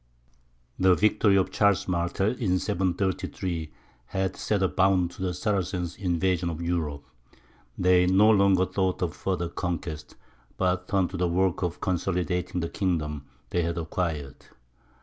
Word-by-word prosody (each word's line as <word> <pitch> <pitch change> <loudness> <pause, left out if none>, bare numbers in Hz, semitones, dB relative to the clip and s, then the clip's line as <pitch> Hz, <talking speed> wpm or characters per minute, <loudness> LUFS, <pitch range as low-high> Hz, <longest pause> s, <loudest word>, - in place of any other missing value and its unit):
The 95 -1 +5
victory 105 -1 +3
of 95 -1 +2
Charles 100 -2 +2
Martel, 90 +3 0
in 95 -7 +1
733, 90 -3 -2 0.4
had 95 +2 -2
set 100 -3 -1
a - - +4
bound 95 -2 +2
to - - -11
the 95 -1 0
Saracens' 90 -2 -2
invasion 90 -2 0
of 80 -1 -5
Europe; 80 -4 -2 0.7
they 90 0 +4
no 100 +4 +5
longer 100 -3 +4
thought 95 -1 -1
of 85 -1 -2
further 90 -3 -2
conquest, 85 -3 -5 0.4
but 90 -1 0
turned 95 -3 +1
to 95 - -4
the 90 0 +1
work 95 +1 +1
of 90 -2 -3
consolidating 90 0 -1
the 85 - -2
kingdom 75 -7 -2 0.2
they 90 - +1
had 85 0 -2
acquired. 80 -4 -3
90 Hz, 145 wpm, -26 LUFS, 85-95 Hz, 0.7 s, The